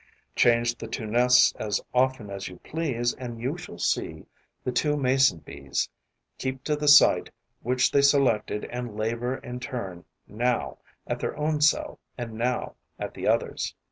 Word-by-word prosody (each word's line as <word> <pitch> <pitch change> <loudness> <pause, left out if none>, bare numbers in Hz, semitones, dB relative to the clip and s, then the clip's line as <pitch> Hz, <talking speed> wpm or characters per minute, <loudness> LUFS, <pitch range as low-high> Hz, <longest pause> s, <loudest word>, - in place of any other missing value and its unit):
Change 120 0 +3
the 115 - -6
two 110 0 -5
nests 125 +3 +5
as 105 -2 -1
often 125 -5 +1
as 100 0 -5
you 90 - -10
please 130 -7 -1
and 120 -3 -7
you 130 +7 -2
shall 175 0 -9
see 80 -1 -1 0.4
the 125 - -1
two 150 +3 +1
Mason 130 - +3
bees 70 -1 -3 0.5
keep 130 0 -4
to 150 - 0
the 150 0 -3
site 145 0 +7 0.3
which 125 +2 +2
they 140 - +4
selected 135 -7 +2
and 120 -3 -6
labour 115 +4 -1
in 125 -1 -7
turn 115 -9 -6 0.2
now 120 +4 -1 0.3
at - - -3
their - - -3
own 150 0 0
cell 155 +1 +2 0.2
and 120 -3 -5
now 120 +3 -2 0.2
at - - -5
the - - -4
other's. - - 0
125 Hz, 165 wpm, -26 LUFS, 110-135 Hz, 0.5 s, site